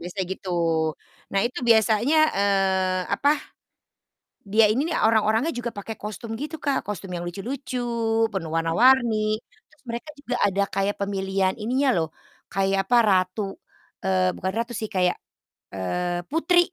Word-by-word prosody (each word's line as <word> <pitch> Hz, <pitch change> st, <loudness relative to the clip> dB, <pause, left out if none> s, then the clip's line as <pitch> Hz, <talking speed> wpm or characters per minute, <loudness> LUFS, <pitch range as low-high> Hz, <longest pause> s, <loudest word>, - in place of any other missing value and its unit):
biasanya 180 Hz, +3 st, -4 dB
gitu. 190 Hz, -, -8 dB, 0.8 s
Nah 195 Hz, -, +2 dB
itu 250 Hz, -, -6 dB
biasanya, 225 Hz, +5 st, +4 dB, 0.2 s
eee, 190 Hz, -2 st, +2 dB
apa, 285 Hz, -, +2 dB, 1.2 s
dia 220 Hz, +1 st, +6 dB
ini 280 Hz, +8 st, 0 dB
orang-orangnya 225 Hz, +2 st, +2 dB
juga 240 Hz, -1 st, -3 dB
pakai 220 Hz, +3 st, -5 dB
kostum 215 Hz, +2 st, -6 dB
gitu 305 Hz, +2 st, -4 dB
Kak, 280 Hz, -2 st, +1 dB
kostum 195 Hz, -2 st, -5 dB
yang 175 Hz, -, -4 dB
lucu-lucu, 250 Hz, +8 st, -5 dB, 0.5 s
penuh 175 Hz, -5 st, -3 dB
warna-warni, 235 Hz, +8 st, +4 dB, 0.5 s
terus 310 Hz, -2 st, -27 dB
mereka 235 Hz, +6 st, -5 dB
juga 250 Hz, -3 st, -3 dB
ada 200 Hz, 0 st, +1 dB
kayak 195 Hz, +1 st, 0 dB
pemilihan 195 Hz, -1 st, 0 dB
ininya 260 Hz, +5 st, +1 dB
loh, 160 Hz, -2 st, 0 dB, 0.4 s
kayak 195 Hz, 0 st, +1 dB
apa 245 Hz, -, +4 dB
ratu 185 Hz, +2 st, +2 dB, 0.6 s
eee, 185 Hz, -1 st, +2 dB
bukan 190 Hz, -, -2 dB
ratu 235 Hz, +1 st, -2 dB
sih, 220 Hz, -, -3 dB
kayak, 180 Hz, -1 st, +2 dB, 0.6 s
eee, 175 Hz, -, -2 dB
putri 330 Hz, +3 st, +3 dB
205 Hz, 135 wpm, -24 LUFS, 190-245 Hz, 1.2 s, dia